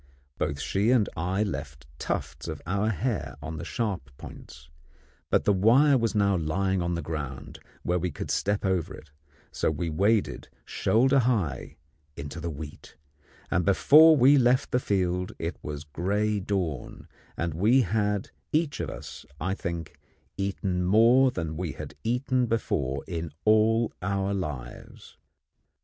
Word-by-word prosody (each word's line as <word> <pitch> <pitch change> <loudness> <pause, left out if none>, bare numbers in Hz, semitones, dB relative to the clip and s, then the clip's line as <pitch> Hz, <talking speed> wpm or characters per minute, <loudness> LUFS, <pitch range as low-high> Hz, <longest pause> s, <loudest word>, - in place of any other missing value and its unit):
Both 70 - -1
she 100 +9 0
and 120 -5 +4
I 95 +5 0
left 70 -7 -6
tufts - - -4
of - - -5
our 100 +5 0
hair 110 - -2
on 80 +2 -6
the - - -6
sharp 100 - -3
points, 70 0 -12 0.6
but - - +2
the 105 - +3
wire 125 +9 +5
was 115 -3 0
now 100 -2 +3
lying 90 +3 0
on 85 0 -1
the 85 - -4
ground 70 -5 -6 0.2
where 90 +1 0
we 90 +1 -1
could - - -5
step 100 0 0
over 95 -4 -1
it; 75 - -15 0.4
so - - 0
we 80 +2 -2
waded 100 +6 +1 0.2
shoulder 130 +5 +2
high 105 - -1 0.4
into 75 +3 -6
the 85 - -3
wheat, 75 -1 -9 0.6
and 90 - +2
before 155 - +7
we 135 +2 +6
left 125 +2 +2
the 125 - +2
field 90 -5 -1
it 85 +2 -4
was 75 0 -6
gray 100 +7 -1
dawn, 90 -9 -3 0.3
and 85 -2 -2
we 110 - +4
had 105 -1 -1 0.2
each 155 -2 0
of - - -3
us, - - -9 0.2
I 95 - -1
think, 85 -5 -5 0.4
eaten 95 -2 -2
more 115 +8 +5
than 80 -8 -4
we 85 -4 -3
had - - -8
eaten 125 +1 0
before 70 - -1
in 85 -2 -4 0.2
all 110 +2 +3
our 100 +1 -1
lives. 75 -11 -7
95 Hz, 150 wpm, -27 LUFS, 80-110 Hz, 0.6 s, before